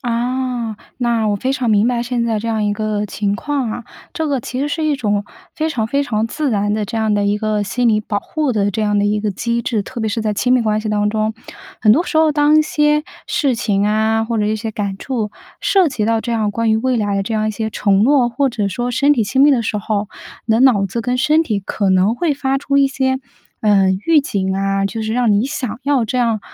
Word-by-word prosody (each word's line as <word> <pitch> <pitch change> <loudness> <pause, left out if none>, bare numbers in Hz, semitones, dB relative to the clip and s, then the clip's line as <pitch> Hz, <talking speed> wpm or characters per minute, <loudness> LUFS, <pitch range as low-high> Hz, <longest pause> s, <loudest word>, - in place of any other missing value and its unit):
啊， 240 -1 -2 0.2
那 235 -3 +1
我 205 - +1
非 260 +6 -1
常 250 -4 -1
明 210 +1 +3
白 240 -1 0
现 240 -1 -1
在 225 -2 0
这 230 - -4
样 220 -2 0
一 205 - +1
个 210 0 -2
情 200 +1 -2
况 275 -2 -2
啊。 235 +1 -6 0.3
这 320 -2 -2
个 275 -4 0
其 250 +2 -6
实 285 - 0
是 315 +1 -2
一 300 -2 +1
种 205 -5 -1 0.3
非 315 0 -1
常 225 -8 -1
非 280 +4 0
常 220 -5 -1
自 290 +4 -2
然 205 -1 0
的 215 -1 -1
这 225 - -5
样 220 -1 +1
的 205 0 +1
一 205 +1 +1
个 215 -1 0
心 240 +5 -1
理 215 -1 +3
保 205 -1 -2
护 300 +5 -2
的 205 -4 +1
这 220 - -1
样 210 -1 +1
的 205 - +2
一 210 +1 +1
个 210 -1 -1
机 235 +4 -2
制。 225 -3 -1
特 240 +4 -7
别 220 - 0
是 225 - -2
在 215 -1 -1
亲 250 +4 +1
密 255 - +4
关 215 -1 0
系 215 - -4
当 210 0 +1
中， 215 0 -1 0.5
很 215 -1 +5
多 330 +8 +2
时 315 - -3
候 315 -1 +4
当 295 +1 +4
一 - - +5
些 300 0 +1 0.2
事 285 -7 +1
情 205 -2 0
啊， 220 +1 +1
或 230 0 -2
者 210 - +1
一 215 +1 0
些 225 +1 -4
感 200 -2 -3
触， 230 -6 -3 0.3
涉 380 -3 +3
及 220 -6 -2
到 225 0 +1
这 235 +1 -3
样 215 -2 0
关 230 +2 0
于 - - +3
未 255 +2 0
来， 200 -2 0
这 215 - -4
样 215 0 0
一 - - 0
些 220 +1 -3
承 200 -1 +2
诺， 260 -1 +4
或 275 +3 0
者 215 -4 -2
说 240 +5 -2
身 280 +4 +3
体 235 -6 +1
亲 210 +7 0
密 295 - +7
的 240 -3 +1
时 210 -1 -2
候， 205 0 -2 0.4
你 220 - +2
的 225 - +2
脑 235 -7 +5
子 230 +5 -3
跟 250 +2 -1
身 300 +5 +3
体 210 -8 -1
可 195 0 -1
能 190 +4 +3
会 300 +3 0
发 270 0 -1
出 280 0 -1
一 275 -1 +5
些， 265 -1 0 0.4
呃， 200 -3 +3 0.2
预 325 -2 +5
警 190 -8 -2
啊， 195 0 0
就 220 +2 -4
是 220 0 -2
让 245 -2 +2
你 205 +3 +2
想 270 -6 -4
要 275 -5 +2
这 255 - -3
样， 230 -3 +1
225 Hz, 280 characters per minute, -18 LUFS, 210-260 Hz, 0.5 s, 密